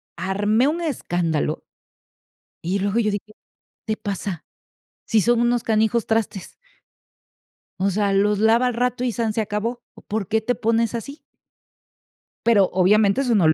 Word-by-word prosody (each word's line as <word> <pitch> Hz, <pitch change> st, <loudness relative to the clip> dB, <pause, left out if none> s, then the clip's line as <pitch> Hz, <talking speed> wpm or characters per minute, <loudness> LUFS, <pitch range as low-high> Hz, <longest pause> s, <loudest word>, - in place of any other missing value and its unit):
armé 205 Hz, +7 st, +1 dB
un 335 Hz, +3 st, -1 dB
escándalo 170 Hz, -, -1 dB, 1.0 s
y 185 Hz, +4 st, -1 dB
luego 205 Hz, +4 st, 0 dB
yo 210 Hz, -2 st, +1 dB
dije: 205 Hz, -, -3 dB
"¿Qué 215 Hz, -, -17 dB, 0.5 s
te 215 Hz, 0 st, -1 dB
pasa? 195 Hz, -4 st, -5 dB, 0.6 s
Si 220 Hz, -2 st, +2 dB
son 240 Hz, +1 st, +2 dB
unos 240 Hz, 0 st, +1 dB
canijos 220 Hz, +1 st, +1 dB
trastes" 220 Hz, -4 st, -2 dB, 1.3 s
o 195 Hz, +1 st, +1 dB
sea, 200 Hz, +1 st, 0 dB
los 205 Hz, +1 st, +2 dB
lava 225 Hz, +3 st, +4 dB
al 245 Hz, -, -1 dB
rato 250 Hz, +1 st, -1 dB
y 245 Hz, -, 0 dB
san 225 Hz, -2 st, -1 dB
se 225 Hz, -, 0 dB
acabó, 220 Hz, +3 st, -3 dB, 0.2 s
¿por 205 Hz, -3 st, -2 dB
qué 220 Hz, 0 st, +1 dB
te 245 Hz, +2 st, -1 dB
pones 230 Hz, 0 st, 0 dB
así? 280 Hz, +6 st, -6 dB, 1.3 s
Pero, 205 Hz, -5 st, +4 dB
obviamente, 200 Hz, +6 st, +3 dB
eso 245 Hz, -4 st, +1 dB
no 180 Hz, -6 st, +4 dB
lo 155 Hz, -, +5 dB
215 Hz, 155 wpm, -22 LUFS, 200-235 Hz, 1.3 s, lo